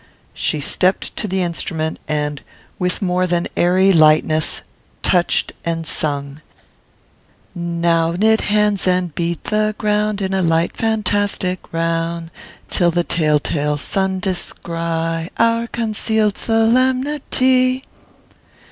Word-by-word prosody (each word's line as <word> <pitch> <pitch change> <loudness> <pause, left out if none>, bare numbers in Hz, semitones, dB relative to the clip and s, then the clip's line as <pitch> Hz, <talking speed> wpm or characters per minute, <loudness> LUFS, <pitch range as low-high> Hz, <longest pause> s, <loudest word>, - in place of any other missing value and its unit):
She 155 - -1
stepped 180 +6 0
to - - -2
the 190 -1 0
instrument, 160 -2 -3
and, 150 -1 -2 0.4
with 180 +3 -1
more 180 0 +1
than 175 -1 0
airy 185 +2 +4
lightness, 155 -1 +3 0.4
touched 175 -1 +2
and 165 -1 -2
sung: 145 -2 -2 1.1
"Now 170 -1 0
knit 220 +5 +3
hands 210 -2 +1
and 180 -3 +1
beat 170 0 -2
the 215 0 0
ground 210 -1 0
In 190 -1 -2
a 190 - +1
light, 165 0 +1
fantastic 205 -4 -1
round, 165 0 -2 0.4
Till 175 -2 +2
the 175 +1 +1
telltale 150 -2 0
sun 190 +5 -1
descry 165 -3 -3
Our 230 0 +2
conceal'd 220 -2 0
solemnity." 255 +2 +2
180 Hz, 110 wpm, -19 LUFS, 165-210 Hz, 1.1 s, airy